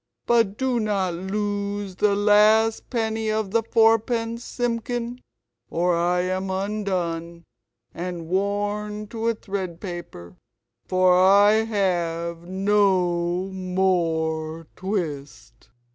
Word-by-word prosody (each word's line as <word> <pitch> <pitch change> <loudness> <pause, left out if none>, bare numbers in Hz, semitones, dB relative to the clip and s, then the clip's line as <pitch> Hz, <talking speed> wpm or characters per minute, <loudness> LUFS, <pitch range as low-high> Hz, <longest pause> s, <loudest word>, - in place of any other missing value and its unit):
But 225 -4 +2
do 260 -2 0
not 200 -5 0
lose 200 +1 -3
the 205 0 +3
last 215 +2 +4
penny 220 -2 -1
of 215 -2 -1
the 230 +1 +3
fourpence, 225 +1 +2
Simpkin, 240 0 -3 0.5
or 175 +1 +1
I 175 +1 +1
am 185 +1 -2
undone 185 -4 -3 0.5
and 175 -1 -5
worn 205 +3 -2
to 225 0 -3
a 230 - +2
thread 190 -5 -5
paper, 170 - -8 0.5
for 185 -1 +4
I 205 +3 +5
have 170 -5 -1
NO 185 -2 +1
MORE 165 -4 -1
TWIST." 140 - -5
195 Hz, 100 wpm, -24 LUFS, 175-215 Hz, 0.5 s, I